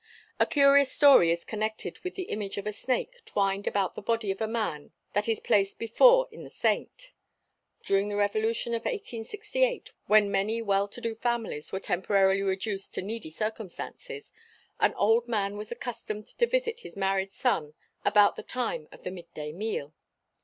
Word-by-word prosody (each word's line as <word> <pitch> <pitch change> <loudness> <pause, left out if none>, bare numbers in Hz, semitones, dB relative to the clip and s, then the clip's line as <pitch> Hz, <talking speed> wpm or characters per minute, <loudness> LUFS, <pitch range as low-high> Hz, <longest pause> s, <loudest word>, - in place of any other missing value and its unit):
A - - +4
curious 280 -2 +5
story 270 - +7
is 170 0 -2
connected 215 0 -3
with 365 - -6
the 380 - -3
image 205 -2 -4
of 200 - -4
a 210 - -2
snake 360 - -2
twined 195 0 -1
about 195 -2 0
the - - -7
body 225 -1 0
of 195 - -6
a 220 - +1
man 215 -10 -3 0.2
that 210 +2 +1
is 225 - +1
placed 195 -1 +2
before - - +5
in - - -10
the - - -10
saint. - - -2 0.7
During 195 +1 +1
the 205 - -3
revolution 220 +3 0
of 230 - -1
1868 425 - -2 0.2
when 210 -1 +5
many 200 +4 +1
well 200 -2 +1
to 225 +4 -10
do 230 -1 -2
families 230 -9 -2
were 190 - -2
temporarily 195 +1 +2
reduced 195 +1 -2
to - - -2
needy 215 -3 -5
circumstances 225 - -6 0.5
an - - +3
old 230 +3 +3
man 205 -3 -1
was 210 +2 -7
accustomed 225 -3 -5
to 475 - +4
visit 485 -1 0
his 480 - -12
married 195 0 0
son 155 - -1 0.3
about 205 -1 +5
the - - -6
time 245 -11 -3
of - - -15
the 180 - -4
mid 175 -2 -10
day 150 0 -5
meal. 175 -6 -3
215 Hz, 175 wpm, -28 LUFS, 195-240 Hz, 0.7 s, story